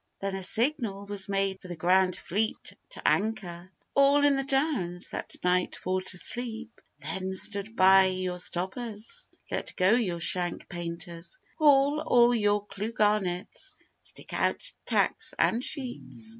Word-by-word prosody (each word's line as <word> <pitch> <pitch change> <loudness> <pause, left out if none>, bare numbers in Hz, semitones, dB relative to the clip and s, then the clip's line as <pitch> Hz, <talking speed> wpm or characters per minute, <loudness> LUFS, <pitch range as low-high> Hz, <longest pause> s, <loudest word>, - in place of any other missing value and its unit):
Then 195 0 -3
a 195 - -3
signal 220 -1 +1
was 200 -1 0
made 195 -1 0
for 185 - -11
the 175 - -6
grand 180 +2 +3
fleet 215 +5 -2 0.2
to - - -4
anchor 185 -4 -1 0.2
All 280 +1 +5
in 285 -1 +4
the 270 - 0
Downs, 270 - 0
that - - -6
night 180 0 +1
for 185 0 -2
to 185 -1 -4
sleep; 235 +2 -4 0.2
Then 185 +6 -3
stand 205 +3 -1
by 190 0 +7
your 185 -1 -2
stoppers, 205 +5 -4 0.2
let - - -3
go 185 +2 +4
your 210 -8 +1
shank 175 +1 -1
painters, 170 - -5 0.2
Haul 290 -1 +5
all 240 0 +5
your 205 -2 +2
clew 205 +2 -4
garnets, 205 -4 0 0.2
stick - - -9
out - - +1 0.2
tacks - - +1
and 235 +3 +2
sheets. 250 -6 -4
195 Hz, 145 wpm, -28 LUFS, 180-235 Hz, 0.2 s, by